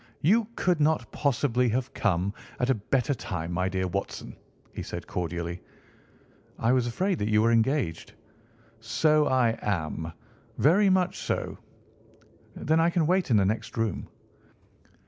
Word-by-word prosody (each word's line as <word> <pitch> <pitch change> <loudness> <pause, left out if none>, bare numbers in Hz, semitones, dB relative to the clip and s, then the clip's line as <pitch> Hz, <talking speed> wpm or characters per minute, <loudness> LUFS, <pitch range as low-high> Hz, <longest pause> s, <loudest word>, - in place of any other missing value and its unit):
"You 210 +7 +3
could 180 -3 +1
not 155 +1 +1
possibly 125 -3 +1
have 130 +3 -2
come 100 -2 0 0.3
at 125 +1 +2
a - - +5
better 125 +5 0
time, 90 -8 -5
my 90 +2 0
dear 95 0 -1
Watson," 100 +2 -4 0.4
he - - -5
said - - -6
cordially. 85 0 -4 1.0
"I 115 - +2
was 125 -2 +2
afraid 185 - -1
that 105 - -1
you 105 0 +4
were 115 - +4
engaged." 115 - 0 0.7
"So 150 +7 +2
I 120 -3 +2
am. 80 -4 -2 0.5
Very 190 +8 +4
much 185 -1 +1
so." - - -3 1.0
"Then 160 +2 +1
I 165 +1 +4
can 170 -2 +1
wait 180 +1 +1
in 115 - +5
the 100 - +3
next 110 +4 -2
room." 115 -5 -2
120 Hz, 145 wpm, -27 LUFS, 100-150 Hz, 1.0 s, a